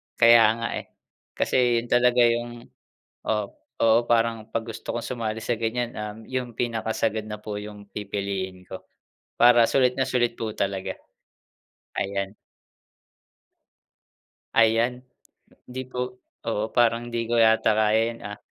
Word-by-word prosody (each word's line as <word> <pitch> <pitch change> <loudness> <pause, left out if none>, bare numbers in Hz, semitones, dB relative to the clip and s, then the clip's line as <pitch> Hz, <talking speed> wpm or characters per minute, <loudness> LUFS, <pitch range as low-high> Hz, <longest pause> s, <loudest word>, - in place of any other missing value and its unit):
Kaya 115 -1 +6
nga, 115 0 -3
eh. - - -12 0.5
Kasi 120 -2 +2
yun 120 - -13
talaga 125 0 +5
yung 120 0 0 0.6
oo, 105 -1 +1 0.4
oo. 115 0 +6
Parang 115 -2 +1
'pag 115 - -1
gusto 110 - -6
kong 120 - -3
sumali 110 -3 -3
sa 120 - 0
ganyan, 120 +1 -1
um, 105 0 -5
yung 125 -3 -4
pinakasagad 110 -2 -1
na 105 -1 -6
po 105 -1 -4
yung 105 -1 -10
pipiliin 100 -2 -4
ko 95 - -9 0.6
para 120 -1 +7
sulit 125 -2 +3
na 135 - +2
sulit 120 -2 +1
po 110 -1 -4
talaga. 95 -2 -2 1.1
Ayan. 100 0 -3 2.2
Ayan! 115 +2 +3 0.7
Di 130 +1 -5
po 125 0 -5 0.3
oo, 110 0 -2
parang 120 0 +2
di 115 -1 -2
ko 120 - +2
yata 110 -1 +4
kaya 110 0 +3
'yan, 115 0 -8
ah. 105 0 -6
115 Hz, 135 wpm, -25 LUFS, 105-120 Hz, 2.2 s, para